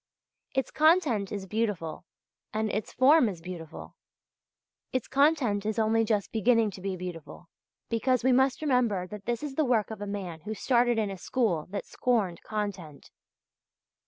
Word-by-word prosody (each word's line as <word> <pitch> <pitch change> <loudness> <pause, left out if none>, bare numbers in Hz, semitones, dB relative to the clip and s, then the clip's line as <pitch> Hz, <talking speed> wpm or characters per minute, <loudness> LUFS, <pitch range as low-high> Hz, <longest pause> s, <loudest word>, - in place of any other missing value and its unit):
Its 265 -1 0
content 305 - +3
is 200 -2 -4
beautiful 200 -7 -2 0.5
and 215 0 -1
its 210 0 -3
form 265 -1 +5
is 180 -4 -7
beautiful. 165 -2 -9 1.0
Its 255 -3 -2
content 275 -8 +2
is 215 +1 -2
only 225 0 +3
just 215 -3 0
beginning 225 -1 +3
to 190 - -10
be 195 0 -2
beautiful, 175 -1 -8 0.4
because 245 +2 +1
we 260 - +4
must 265 +3 +2
remember 240 -10 +1
that 200 +1 -9
this 240 +3 -1
is 290 -2 -4
the 310 - +1
work 235 -5 +1
of 215 -2 -7
a 205 - -4
man 190 -5 -5
who 215 +4 -5
started 240 0 +2
in 210 -3 0
a 190 - -7
school 180 -10 0
that 200 +1 -4
scorned 215 -9 0
content. 200 -9 -5
215 Hz, 160 wpm, -28 LUFS, 195-250 Hz, 1.0 s, form